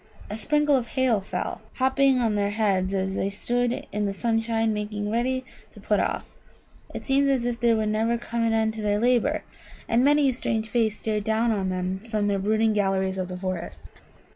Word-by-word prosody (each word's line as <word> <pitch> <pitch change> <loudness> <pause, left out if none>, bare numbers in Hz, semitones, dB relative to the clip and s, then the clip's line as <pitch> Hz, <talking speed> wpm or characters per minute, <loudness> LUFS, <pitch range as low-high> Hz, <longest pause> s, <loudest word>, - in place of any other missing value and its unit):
A - - -2
sprinkle 295 +5 +2
of 245 -3 0
hail 255 -6 +1
fell, 195 - -4
hopping 265 0 +3
on 230 -3 +1
their 205 -1 +1
heads 200 -3 +1
as 190 -1 -1
they 195 - -1
stood 245 +4 -1
in 210 0 -1
the 195 - -3
sunshine 225 +1 0
making 210 0 -3
ready 255 +3 0 0.2
to - - -15
put - - +1
off. - - -1 0.6
It - - -7
seemed 275 0 +3
as 260 -3 +1
if 240 -1 -2
there 230 -1 +3
would 215 -1 0
never 225 +2 +1
come 235 0 -3
an 230 - +2
end 220 -1 +1
to 220 - -6
their 205 -1 +1
labour, 250 +6 +2 0.4
and 235 +2 +3
many 290 0 +4
a 260 - +2
strange 225 -3 -2
face 220 -2 0
stared 215 -2 -1
down 220 +2 +1
on 195 -3 -1
them 185 +1 -2
from 215 -1 -2
the 200 -1 +1
brooding 215 +2 +2
galleries 190 -2 0
of 185 - -2
the 180 0 -6
forest. 185 -2 -5
220 Hz, 205 wpm, -25 LUFS, 205-240 Hz, 0.6 s, many